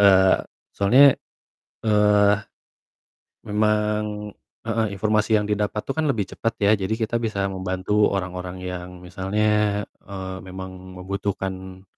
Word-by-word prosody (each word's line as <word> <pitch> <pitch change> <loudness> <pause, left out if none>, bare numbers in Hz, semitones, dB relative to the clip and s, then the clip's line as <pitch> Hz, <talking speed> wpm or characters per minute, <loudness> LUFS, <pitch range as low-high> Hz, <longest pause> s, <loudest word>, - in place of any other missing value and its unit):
eee, 95 -2 +6 0.4
soalnya, 130 +8 +6 0.7
eee, 105 -1 +5 1.1
memang 105 0 0 0.3
heeh, 115 -1 0
informasi 110 +2 +2
yang - - -1
didapat 105 0 -1
tuh - - -1
kan 160 - +1
lebih 110 -8 0
cepat 115 - -2
ya, 100 - +5
jadi 95 +3 -1
kita 115 +1 -2
bisa 110 -4 -2
membantu 95 +3 +1
orang-orang 90 -1 -4
yang 90 -1 -5
misalnya, 105 +3 0 0.2
eee, 95 -1 -6
memang 95 0 -9
membutuhkan 95 -1 -4
100 Hz, 115 wpm, -23 LUFS, 95-105 Hz, 1.1 s, eee